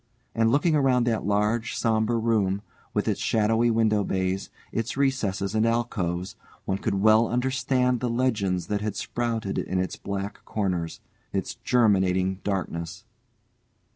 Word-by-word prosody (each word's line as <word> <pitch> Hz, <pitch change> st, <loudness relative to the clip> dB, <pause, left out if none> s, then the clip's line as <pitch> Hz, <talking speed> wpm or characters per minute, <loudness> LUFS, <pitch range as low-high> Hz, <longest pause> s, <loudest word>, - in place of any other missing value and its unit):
And 115 Hz, 0 st, +3 dB
looking 150 Hz, +6 st, +3 dB
around 130 Hz, -4 st, +3 dB
that 115 Hz, -4 st, 0 dB
large 105 Hz, +3 st, +1 dB
sombre 110 Hz, +1 st, +1 dB
room, 105 Hz, -4 st, +1 dB, 0.3 s
with -, -, -1 dB
its -, -, 0 dB
shadowy 115 Hz, +2 st, +2 dB
window 110 Hz, -2 st, +2 dB
bays, 95 Hz, 0 st, -1 dB, 0.2 s
its 115 Hz, +3 st, -3 dB
recesses 105 Hz, -8 st, 0 dB
and 110 Hz, 0 st, +2 dB
alcoves, 100 Hz, -7 st, -1 dB, 0.3 s
one 95 Hz, 0 st, -1 dB
could 105 Hz, -1 st, -1 dB
well 110 Hz, +1 st, +6 dB
understand 125 Hz, 0 st, +1 dB
the 125 Hz, -, -1 dB
legends 105 Hz, -8 st, 0 dB
that 100 Hz, +2 st, -2 dB
had 105 Hz, -1 st, -2 dB
sprouted 115 Hz, -4 st, -2 dB
in 95 Hz, -, -2 dB
its 95 Hz, 0 st, -2 dB
black 100 Hz, 0 st, -5 dB
corners, 90 Hz, -6 st, -2 dB, 0.3 s
its -, -, -2 dB
germinating 95 Hz, -5 st, +2 dB
darkness. 85 Hz, -4 st, -3 dB
110 Hz, 140 wpm, -26 LUFS, 95-120 Hz, 0.3 s, well